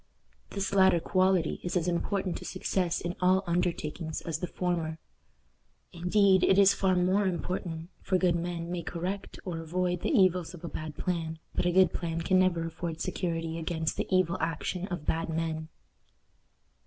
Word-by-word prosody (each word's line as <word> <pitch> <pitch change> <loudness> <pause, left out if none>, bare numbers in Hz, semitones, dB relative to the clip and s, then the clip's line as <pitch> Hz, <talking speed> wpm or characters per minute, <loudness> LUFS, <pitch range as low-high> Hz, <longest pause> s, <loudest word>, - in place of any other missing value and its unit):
This 200 0 -3
latter 190 -3 +5
quality 185 -1 +2
is 175 +1 -1
as 175 0 0
important 185 +1 -1
to - - -9
success 185 -2 -1
in 175 +1 -3
all 185 +1 +4
undertakings 170 -2 -2
as 160 -2 -3
the 180 - -2
former. 170 -3 -2 1.0
Indeed, 190 +2 +3
it 190 - +5
is 200 0 +7
far 190 -1 +2
more 185 +3 +2
important, 175 -1 -3
for 185 - +1
good 180 -2 +2
men 170 0 -3
may 175 -1 -2
correct 180 +4 -4
or 175 -3 -3
avoid 175 +2 -1
the - - -1
evils 185 - +3
of 175 - -14
a - - -4
bad 155 -2 -6
plan, 165 -3 -2 0.2
but - - 0
a - - +3
good 185 -1 +5
plan 165 -1 -2
can 185 +2 +3
never 175 -3 +2
afford 165 0 -5
security 165 -3 -2
against 160 -1 -2
the - - -2
evil 185 -2 +2
action 165 +3 -2
of 175 -6 -5
bad 165 +1 -1
men. 160 -1 -2
175 Hz, 170 wpm, -29 LUFS, 165-185 Hz, 1.0 s, is